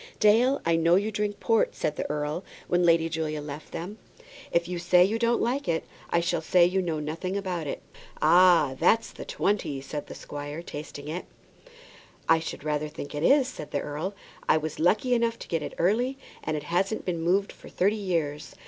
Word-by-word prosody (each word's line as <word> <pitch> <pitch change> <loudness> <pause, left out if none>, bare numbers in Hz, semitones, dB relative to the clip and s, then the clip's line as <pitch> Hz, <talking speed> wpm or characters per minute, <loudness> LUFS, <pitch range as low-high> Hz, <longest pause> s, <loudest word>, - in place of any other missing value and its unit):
"Dale, 235 +6 +4
I 165 0 +3
know 165 +1 +4
you 205 +3 +1
drink 210 -1 -2
port," 225 -2 +2
said 150 - -1
the - - -4
earl 150 +4 -2 0.2
when 175 0 +2
Lady 165 -1 +4
Julia 155 -2 -2
left 150 +1 -8
them. 195 +6 -6 0.5
"If 170 0 +1
you 180 -1 -3
say 175 +1 +5
you 220 +4 -1
don't 235 0 +2
like 265 +4 0
that, 165 -1 0 0.3
I 170 - +2
shall 170 -1 0
say 175 +2 +5
you 185 +2 +1
know 165 -4 -2
nothing 165 +6 -3
about 180 -6 -3
it." - - -5 0.4
"Ah! 175 -6 +5
that's 225 0 +3
the - - -9
'20," 195 -9 -1
said 145 +2 -6
the - - -8
squire, 145 +3 -7
tasting 145 -2 -8
it. 165 +4 -4 1.0
"I 165 - +5
should 160 - -6
rather 150 0 -1
think 150 -1 -8
it 145 - -3
is," 270 - +5
said 205 - -8
the - - -1
earl. 155 +7 -4 0.3
"I - - +6
was 155 0 -4
lucky 210 +9 +3
enough 230 -1 +1
to - - -10
get 165 -2 -1
it - - -6
early, 240 +10 +1 0.3
and 155 0 -1
it 150 - -5
hasn't 185 +7 -1
been 170 -3 -2
moved 190 +4 +1
for - - -14
thirty 200 +4 +1
years. 165 -8 -2
170 Hz, 200 wpm, -27 LUFS, 155-205 Hz, 1.0 s, I